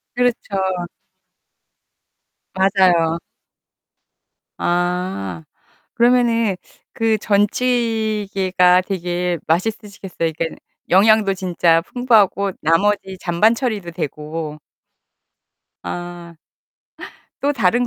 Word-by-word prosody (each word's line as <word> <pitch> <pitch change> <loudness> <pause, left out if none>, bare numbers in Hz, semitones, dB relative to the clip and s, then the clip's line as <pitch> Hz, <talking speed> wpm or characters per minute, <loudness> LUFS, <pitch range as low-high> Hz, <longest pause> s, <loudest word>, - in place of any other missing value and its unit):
그렇죠. 245 -4 0 2.0
맞아요. 185 -4 +3 1.4
아. 175 - -2 0.5
그러면은 235 -4 +2 0.3
그 225 -1 +1
전찌개가 205 -4 +1
되게 180 -2 -2
맛있으시겠어요. 200 +2 -3 0.2
그러니까는 165 -1 -3 0.3
영양도 205 +1 +4
진짜 175 -3 +2
풍부하고 205 -3 +2
나머지 190 +3 +1
잔반 185 +7 +2
처리도 215 -8 -3
되고 150 0 -5 1.3
아. 175 - -7 1.1
또 285 +1 +1
다른 245 0 +1
190 Hz, 180 characters per minute, -19 LUFS, 175-220 Hz, 2.0 s, 영양도